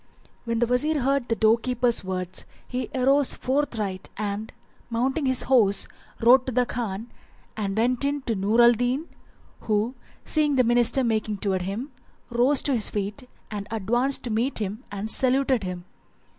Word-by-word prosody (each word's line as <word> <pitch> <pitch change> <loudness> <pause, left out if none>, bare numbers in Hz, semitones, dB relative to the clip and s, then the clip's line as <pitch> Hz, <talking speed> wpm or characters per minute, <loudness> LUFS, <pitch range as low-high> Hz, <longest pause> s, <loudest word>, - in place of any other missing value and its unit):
When 230 -1 -1
the 240 - +3
Wazir 275 +5 +1
heard 270 -1 +1
the 230 - 0
door 220 +1 +4
keeper's 245 -2 0
words 185 -1 -5 0.2
he 250 0 -4
arose 270 +2 +3
forthright; 225 -8 -2
and, 210 +1 -3 0.4
mounting 265 +5 0
his 260 -1 +1
horse, 215 -7 +3 0.3
rode 250 +3 +5
to - - -1
the 250 +1 +2
Khan 220 -5 -3
[FN#379] 235 - -12 0.5
and 200 -1 -2
went 245 +4 +1
in 285 0 -1
to 235 - -1
Nur 210 +5 +2
al 235 - +8
Din 245 +7 -1 0.5
who, 215 +3 0 0.3
seeing 300 -2 +2
the 255 - +4
minister 240 +2 +3
making 215 -3 -1
towards 190 -2 -1
him, 225 +9 -4 0.4
rose 250 +4 +3
to 280 - +1
his 225 -4 +2
feet 210 +5 -4 0.2
and 205 -1 -5
advanced 240 +6 0
to 240 - -3
meet 235 +6 0
him 210 +3 -4
and 205 +1 -4
saluted 260 -2 +2
him. 180 -1 -5
235 Hz, 170 wpm, -25 LUFS, 210-260 Hz, 0.5 s, al